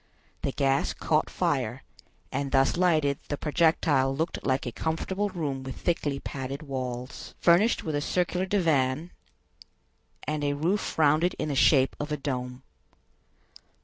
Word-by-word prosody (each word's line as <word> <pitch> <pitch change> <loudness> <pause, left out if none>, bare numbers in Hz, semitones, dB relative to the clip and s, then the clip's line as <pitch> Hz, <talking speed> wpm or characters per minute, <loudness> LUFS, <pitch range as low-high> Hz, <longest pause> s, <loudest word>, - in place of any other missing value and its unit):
The 140 - -1
gas 135 0 +1
caught - - +1
fire, - - -1 0.5
and 140 -1 -2
thus 135 -1 +3
lighted 155 -6 +2
the 145 - -2
projectile 150 -4 +2
looked 160 +4 -2
like 130 -1 0
a 120 - -3
comfortable 185 - -2
room 150 -8 -3
with 130 -1 -6
thickly 145 -5 -1
padded 135 +2 -5
walls, 130 -3 -5
furnished 180 +7 +4
with 155 - -3
a 145 - 0
circular 180 +3 0
divan, 160 -4 +1 1.1
and 150 -1 -2
a 145 0 +1
roof 170 +8 -1
rounded 155 +3 +3
in - - -2
the 140 - -1
shape 135 -1 +4
of 150 +1 -4
a 150 - 0
dome. 125 -2 -4
145 Hz, 145 wpm, -27 LUFS, 135-165 Hz, 1.1 s, furnished